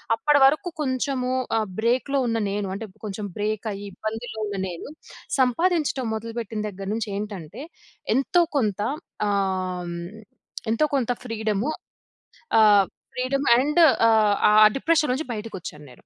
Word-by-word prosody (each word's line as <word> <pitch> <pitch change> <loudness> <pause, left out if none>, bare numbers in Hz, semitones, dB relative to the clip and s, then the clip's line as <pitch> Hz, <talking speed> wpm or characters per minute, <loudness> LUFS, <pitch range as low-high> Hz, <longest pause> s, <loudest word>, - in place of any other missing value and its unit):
అప్పడి 290 +5 +3
వరకు 305 +7 +3
కొంచెము 260 -1 -1 0.3
ఆహ్, 215 -1 0
బ్రేక్‌లో 255 +5 +1
ఉన్న 230 0 0
నేను, 200 -1 -2
అంటే, 220 +2 -6 0.2
కొంచెం 205 0 -4
బ్రేకయ్యి 210 -1 -3
ఇబ్బందుల్లో 220 +1 -5
ఉన్న 205 -1 -4
నేను, 175 -2 -7 0.5
సంపాదించడం 280 0 +1
మొదలుపెట్టిన 225 -1 -5
దెగ్గరనుంచేంటంటే, 200 - -5 0.5
ఎంతో 340 +6 +3
కొంత 210 -6 0 0.5
ఆం 185 -3 -1 0.8
ఎంతో 230 +7 +3
కొంత 250 -3 +1
ఫ్రీడము 220 +1 -1 0.9
ఆహ్, 205 -2 +6 0.3
ఫ్రీడమ్ 275 +2 -1
అండ్ 300 +6 +2 0.3
ఆహ్, 215 -2 +4
ఆ - - +4 0.2
డిప్రెషన్ 310 -2 +2
నుంచి 285 -1 -4
బయటకొచ్చాన్నేను. 175 - -8
225 Hz, 110 wpm, -24 LUFS, 205-260 Hz, 0.9 s, ఆహ్